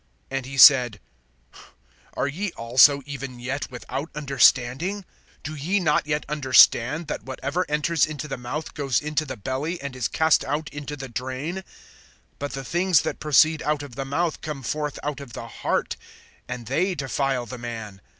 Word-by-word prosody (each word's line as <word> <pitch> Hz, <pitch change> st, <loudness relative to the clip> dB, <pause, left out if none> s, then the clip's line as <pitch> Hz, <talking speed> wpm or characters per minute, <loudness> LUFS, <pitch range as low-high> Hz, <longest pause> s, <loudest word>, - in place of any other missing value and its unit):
(16)And 135 Hz, -1 st, -2 dB
he 135 Hz, +1 st, -7 dB
said: 125 Hz, -6 st, +8 dB, 1.2 s
Are -, -, 0 dB
ye 180 Hz, +7 st, -3 dB
also 130 Hz, +4 st, +5 dB
even 135 Hz, -3 st, -7 dB
yet 135 Hz, +4 st, -4 dB
without 135 Hz, +4 st, -6 dB
understanding? 140 Hz, -, +2 dB, 0.4 s
(17)Do 155 Hz, -1 st, -6 dB
ye 190 Hz, +7 st, +1 dB
not 150 Hz, -4 st, +1 dB
yet 150 Hz, 0 st, -1 dB
understand, 145 Hz, +1 st, +4 dB
that 150 Hz, -, -4 dB
whatever 140 Hz, +7 st, -3 dB
enters 150 Hz, 0 st, +2 dB
into 150 Hz, -2 st, -6 dB
the 135 Hz, -, -4 dB
mouth 125 Hz, +6 st, -5 dB
goes 135 Hz, -5 st, 0 dB
into 150 Hz, +1 st, -2 dB
the 130 Hz, -, -6 dB
belly, 135 Hz, -, -3 dB
and 140 Hz, -2 st, -6 dB
is 125 Hz, -2 st, -1 dB
cast 160 Hz, -1 st, +3 dB
out 150 Hz, +2 st, -3 dB
into 145 Hz, 0 st, -6 dB
the 135 Hz, -2 st, -7 dB
drain? 130 Hz, +9 st, -4 dB, 0.8 s
(18)But 145 Hz, -, -3 dB
the 135 Hz, -1 st, -5 dB
things 175 Hz, 0 st, +3 dB
that -, -, -3 dB
proceed 155 Hz, +1 st, +4 dB
out 150 Hz, -1 st, -1 dB
of 140 Hz, -4 st, -10 dB
the 135 Hz, +3 st, -4 dB
mouth 155 Hz, +5 st, -1 dB
come 150 Hz, -4 st, -6 dB
forth 150 Hz, +4 st, -3 dB
out 145 Hz, -1 st, -3 dB
of 135 Hz, -4 st, -10 dB
the 115 Hz, -, -7 dB
heart; -, -, -2 dB, 0.5 s
and 125 Hz, -2 st, -6 dB
they 175 Hz, -, 0 dB
defile 135 Hz, -3 st, -1 dB
the 125 Hz, +1 st, -8 dB
man. 110 Hz, -5 st, -7 dB
140 Hz, 170 wpm, -24 LUFS, 130-150 Hz, 1.2 s, said